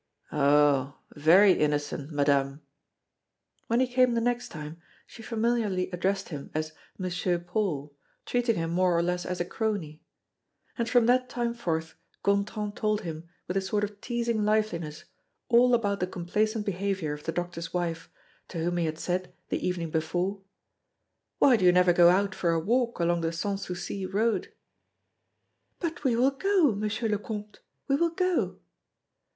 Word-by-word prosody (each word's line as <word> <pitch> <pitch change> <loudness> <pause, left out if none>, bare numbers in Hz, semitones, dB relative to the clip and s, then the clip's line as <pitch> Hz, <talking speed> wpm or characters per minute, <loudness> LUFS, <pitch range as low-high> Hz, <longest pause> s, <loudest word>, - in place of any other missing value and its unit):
"Oh! 145 -1 +3 0.2
very 175 +7 +6
innocent, 145 -2 -1
Madame!" 140 -1 +1 1.0
When 230 +1 +2
he 260 - +4
came 250 -1 +3
the - - +2
next 245 +1 -1
time, 155 +2 -8 0.2
she 230 - -13
familiarly 220 -5 0
addressed 190 +2 -1
him 145 -4 -7
as 155 0 -2 0.3
"Monsieur 180 -1 -1
Paul," 170 -5 -3 0.3
treating 240 -2 +1
him 165 0 -2
more 180 0 +2
or 170 - +2
less 180 0 -1
as 180 0 -3
a 175 - 0
crony. 180 -8 -3 0.7
And 235 -2 -2
from 245 -2 +4
that 250 +1 +3
time 240 -1 -1
forth, 165 -8 -3 0.3
Gontran 205 +1 0
told 215 -1 0
him, 165 -2 -7 0.2
with 180 - -3
a - - +2
sort 205 +2 -1
of 205 0 -5
teasing 235 -3 -1
liveliness, 205 -8 -1 0.5
all 245 +1 +6
about 205 -4 0
the 180 - 0
complaisant 210 +5 -1
behavior 190 -5 -2
of 150 0 -9
the 165 - -1
doctor's 175 -1 -4
wife, 170 -2 -3 0.4
to 175 - -7
whom 175 +2 -1
he 170 - +1
had 155 0 -3
said, 180 +1 -2 0.2
the - - -2
evening 170 -3 -2
before: 180 +5 -1 1.0
"Why 255 -4 +5
do 190 - -2
you 180 - +7
never 180 0 +4
go 175 0 +7
out 195 +2 +2
for 175 - -1
a 165 0 +2
walk 235 +6 0
along 170 0 +1
the 165 0 0
Sans 195 +4 -3
Souci 185 +1 -4
road?" 220 +4 0 1.3
"But 335 -3 -4
we 255 -4 +2
will 255 +4 +3
go, 365 0 +3
M. 205 0 -4
le 215 0 0
Comte 210 -1 -7 0.3
we 275 - +3
will 340 +2 +2
go." 365 +1 0
190 Hz, 165 wpm, -28 LUFS, 165-225 Hz, 1.3 s, you